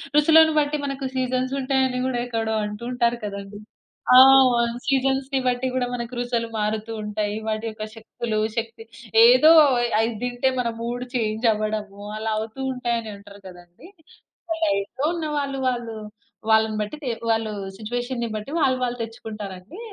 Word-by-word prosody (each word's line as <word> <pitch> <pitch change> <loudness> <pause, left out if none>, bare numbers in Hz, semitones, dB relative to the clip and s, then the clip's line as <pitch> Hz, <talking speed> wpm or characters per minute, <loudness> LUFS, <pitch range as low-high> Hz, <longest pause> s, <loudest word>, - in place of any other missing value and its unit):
రుచులను 315 +1 +6
బట్టి 300 0 +2
మనకు 275 -1 -4
సీజన్స్ 255 0 -1
ఉంటాయి 265 0 0
అని 250 -1 -2
కూడా 260 -1 -1
ఎక్కడో 225 -2 -2
అంటూ 210 +2 -7
ఉంటారు 240 -1 +1
కదండి. 200 0 -6 0.6
ఆ - - +10 0.3
వొన్ 235 -1 +1
సీజన్స్‌ని 270 0 +1
బట్టి 250 +1 0
కూడా, 255 -1 +1
మనకు 235 0 -5
రుచులు 240 -1 -1
మారుతూంటాయి. 210 -1 -3
వాటి 215 +1 -2
యొక్క 215 -1 -6
శక్తులు 225 0 -4 0.2
శక్తి 225 0 -4 0.4
ఏదో 255 +6 +7 0.3
అయ్ 240 0 0
అది 225 +1 +1
తింటే, 245 +1 0
మన 240 -1 0
మూడ్ 240 +1 -3
చేంజ్ 220 0 -1
అవ్వడము, 210 -1 -4 0.2
అలా 220 +1 -3
అవుతూ 220 +4 -7
ఉంటాయి 240 -2 -1
అని 220 -1 -8
అంటారు 200 0 -14
కదండీ. 175 - -14 0.8
డైట్‌లో 200 +3 -1
ఉన్నవాళ్ళు, 295 -4 -2
వాళ్ళు 240 -2 -4 0.6
వాళ్ళని 220 0 +3
బట్టి 210 +8 -5
తె 250 - 0 0.2
వాళ్ళు 225 -1 0 0.3
సిట్యుయేషన్‌ని 240 +2 -3
బట్టి 215 +6 -7
వాళ్ళు 260 -3 +3
వాళ్ళు 245 0 -2
తెచ్చుకుంటారండి. 215 - -8
235 Hz, 150 wpm, -23 LUFS, 215-255 Hz, 0.8 s, ఆ